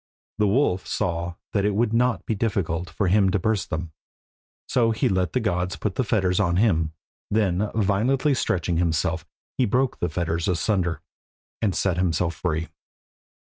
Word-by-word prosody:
The 105 - +4
wolf 100 -4 +1
saw 85 0 -2 0.2
that 100 - +2
it 105 0 +1
would 115 +1 +1
not 125 +1 +1
be - - 0
difficult 95 -6 -1
for 95 +4 -1
him 95 +1 +4
to 95 - +2
burst 105 +1 0
them, 80 0 -4 0.8
so 115 -2 +2
he 110 - +1
let 95 -1 0
the 130 - +2
gods 90 -4 -1
put 105 - -2
the 130 - 0
fetters 95 -5 +1
on 85 -4 +2
him, 85 -6 +2 0.4
then 100 -1 +1
violently 115 +8 +2
stretching 90 -8 0
himself 85 0 0 0.3
he 130 - +4
broke 125 +4 +1
the 90 - 0
fetters 85 0 -1
asunder, 90 0 0 0.6
and 105 -5 +1
set 95 -3 +1
himself 85 -1 +1
free. 85 -2 -2
95 Hz, 165 wpm, -24 LUFS, 85-110 Hz, 0.8 s, The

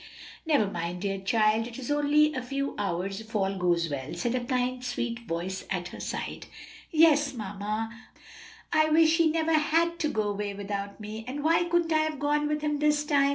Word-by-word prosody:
"Never 290 -9 +4
mind, 175 -1 -4
dear 195 -1 -1
child, 215 +3 +2
it 235 - -9
is 260 -1 -6
for 290 0 +2
only 300 +1 +4
a 255 - -2
few 275 +2 -3
hours, 195 +2 -2
if 220 0 -12
all 195 -1 +1
goes 175 -2 +1
well," 140 0 -5
said 235 +8 -1
a 255 -1 -1
kind 250 0 -1
sweet 240 -1 -2
voice 180 +3 -3
at 180 -2 -2
her - - -10
side. - - -5 0.4
"Yes, 300 -4 +4
mamma, 210 +1 -3 0.8
but - - +3
oh, 310 - +5
I - - -2
wish 320 +1 +5
he 335 -2 +4
never 325 0 +1
had 330 +2 +2
to 305 - +1
go 220 -6 0
away 205 -1 -3
without 200 0 -5
me! 215 +1 -6
And 285 +3 -4
why 330 +2 +3
couldn't 345 -1 +1
I 310 - +4
have 310 -1 -1
gone 295 +1 +1
with 300 0 -1
him 295 -1 0
this 300 0 +2
time?" 280 -2 +3
245 Hz, 210 wpm, -28 LUFS, 200-300 Hz, 0.8 s, oh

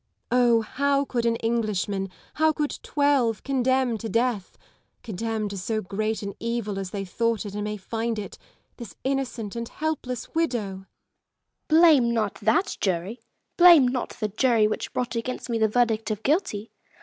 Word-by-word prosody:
Oh! 240 -2 +4
how 280 +6 0
could 235 -3 -1
an 230 - +2
Englishman, 210 -4 -1 0.3
how 315 0 +5
could 300 -1 -2
twelve, 275 -7 +1
condemn 260 -3 +1
to 225 - -5
death 230 -4 -1 0.2
— - - -45
condemn 220 0 -3
to 200 - -6
so 215 +4 -1
great 215 +2 -2
an 200 0 -4
evil 230 -4 -2
as 190 -2 -4
they 195 0 -4
thought 230 +3 -1
it 200 - -6
and 210 0 -3
may 210 0 -3
find 225 +3 -3
it 210 - -7 0.2
— - - -43
this 235 -5 -9
innocent 260 -6 -2
and 235 0 -4
helpless 295 -6 -4
widow 250 -11 0
1 - - -7
Lady - - -7
Lisle. 190 0 -12 1.2
Blame - - +1
not 215 -3 0
that 220 - +1
jury! 190 +5 -1 0.2
— - - -52
blame 340 -7 +8
not 250 -1 -2
the 215 - 0
jury 220 0 +3
which 215 - -3
brought 250 -1 -2
against 245 +1 -4
me 230 - 0
the 220 - +4
verdict 225 -1 +1
of 215 0 -3
guilty. 275 - 0
230 Hz, 185 wpm, -25 LUFS, 210-250 Hz, 1.2 s, blame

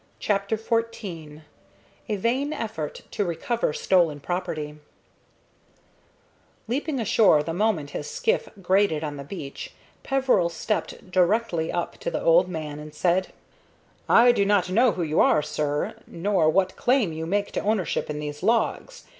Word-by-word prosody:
CHAPTER 200 +1 0
XIV 205 -9 -3 0.7
A 215 - +1
VAIN 255 +9 0
EFFORT 220 - -5
TO 205 - -1
RECOVER 180 +5 -1
STOLEN 165 -2 +2
PROPERTY 155 -3 -4 1.9
Leaping 275 +4 -2
ashore 210 -8 +4
the 165 - -4
moment 175 -7 0
his 145 - -5
skiff 475 0 0
grated 185 -4 +2
on 145 -2 -4
the 140 - -6
beach, 140 -3 -8 0.3
Peveril 260 -10 +2
stepped 185 +1 -4
directly 180 -2 +1
up 175 - -3
to - - -3
the - - -2
old - - +5
man 155 -4 -5
and 150 0 -10
said: 180 +3 +1 0.8
"I 240 +1 +7
do 220 -4 +2
not 200 -2 +2
know 235 +4 +4
who 175 - -2
you 155 -1 0
are, 150 - +4
sir, 150 0 -2
nor 175 -2 +1
what 185 +3 +1
claim 245 -9 +2
you 160 +1 -4
make 200 +3 -1
to - - -2
ownership 205 -7 -1
in 150 0 -3
those 150 0 -6
logs. 235 - 0
185 Hz, 145 wpm, -25 LUFS, 155-225 Hz, 1.9 s, I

